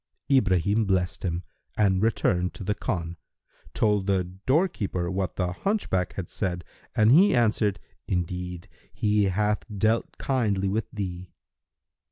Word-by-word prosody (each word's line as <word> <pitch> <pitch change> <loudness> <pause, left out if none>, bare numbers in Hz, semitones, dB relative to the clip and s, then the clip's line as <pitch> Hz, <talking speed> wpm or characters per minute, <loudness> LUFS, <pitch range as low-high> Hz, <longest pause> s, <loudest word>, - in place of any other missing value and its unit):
Ibrahim 100 -3 +3
blessed 95 -2 0
him 85 -1 -2 0.3
and 95 -3 +3
returning 90 -5 +1
to - - -7
the 105 - 0
khan, 85 -8 -3 0.6
told 105 -3 +2
the 95 -2 +2
doorkeeper 95 - -1
what 95 -1 -2
the 90 -2 -1
hunchback 95 - -1
had 95 -4 -5
said, 90 -3 -3 0.3
and 110 +1 +5
he 175 +4 +6
answered, 105 -4 +2 0.3
"Indeed, 90 -1 -3 0.2
he 105 0 +2
hath 105 +2 +1 0.2
dealt 110 +3 +1
kindly 105 -8 0
with 105 +2 -1
thee." 90 -3 -5
95 Hz, 130 wpm, -26 LUFS, 90-110 Hz, 0.6 s, he